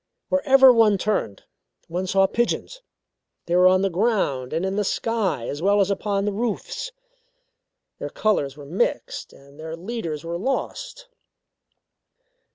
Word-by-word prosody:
Wherever 270 Hz, -2 st, +6 dB
one 220 Hz, -3 st, +4 dB
turned, 190 Hz, -, -2 dB, 0.4 s
one 180 Hz, +3 st, -3 dB
saw 195 Hz, +1 st, +4 dB
pigeons. 240 Hz, -, -2 dB, 0.6 s
They 170 Hz, -, 0 dB
were 180 Hz, +1 st, +6 dB
on 185 Hz, +1 st, +4 dB
the 195 Hz, -, +2 dB
ground 170 Hz, -, 0 dB
and 165 Hz, +4 st, -1 dB
in 190 Hz, 0 st, -2 dB
the 210 Hz, -, +1 dB
sky, 195 Hz, -, -1 dB
as 145 Hz, -, -5 dB
well 200 Hz, +3 st, +3 dB
as 200 Hz, 0 st, +2 dB
upon 200 Hz, 0 st, -1 dB
the 210 Hz, -, 0 dB
roofs. 235 Hz, -, -3 dB, 1.1 s
Their -, -, -4 dB
colours 145 Hz, -11 st, 0 dB
were 145 Hz, -, -10 dB
mixed, 205 Hz, -, -2 dB
and 140 Hz, +2 st, -18 dB
their 160 Hz, +1 st, -6 dB
leaders 170 Hz, -5 st, -5 dB
were 170 Hz, +1 st, -4 dB
lost. -, -, -4 dB
195 Hz, 145 wpm, -23 LUFS, 165-230 Hz, 1.1 s, Wherever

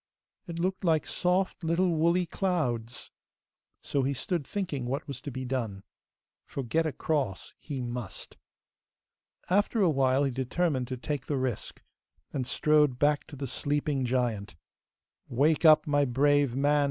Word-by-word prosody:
It 170 Hz, -1 st, -6 dB
looked 185 Hz, +3 st, -1 dB
like 160 Hz, -3 st, +2 dB
soft 180 Hz, +1 st, 0 dB
little 170 Hz, +3 st, +2 dB
woolly 170 Hz, +3 st, +2 dB
clouds! 140 Hz, -, -2 dB, 0.7 s
So 140 Hz, -, 0 dB
he 135 Hz, +1 st, 0 dB
stood 165 Hz, +1 st, -2 dB
thinking 150 Hz, -11 st, -3 dB
what 135 Hz, +3 st, -3 dB
was 135 Hz, -2 st, -6 dB
to 145 Hz, -, -5 dB
be 130 Hz, 0 st, -5 dB
done, 115 Hz, -7 st, -3 dB, 0.6 s
for 140 Hz, -, -5 dB
get 160 Hz, +7 st, +1 dB
across 140 Hz, -8 st, -2 dB
he 140 Hz, -4 st, -5 dB
must. 120 Hz, -4 st, -6 dB, 1.1 s
After 205 Hz, +5 st, +2 dB
a 180 Hz, -4 st, +4 dB
while, 135 Hz, -1 st, +3 dB
he 135 Hz, -, +1 dB
determined 130 Hz, +1 st, -1 dB
to 130 Hz, -, -4 dB
take 140 Hz, +1 st, -4 dB
the 145 Hz, -, 0 dB
risk, 130 Hz, -5 st, -3 dB, 0.5 s
and 130 Hz, -3 st, -2 dB
strode 150 Hz, -1 st, +3 dB
back 145 Hz, +2 st, +2 dB
to 155 Hz, -, -10 dB
the 140 Hz, 0 st, -4 dB
sleeping 145 Hz, +2 st, -1 dB
giant. 120 Hz, -6 st, -1 dB, 0.7 s
'Wake 150 Hz, +7 st, +2 dB
up, 155 Hz, -1 st, +7 dB
my 145 Hz, -1 st, +2 dB
brave 140 Hz, 0 st, +2 dB
man! 145 Hz, +2 st, +3 dB
145 Hz, 150 wpm, -29 LUFS, 130-160 Hz, 1.1 s, up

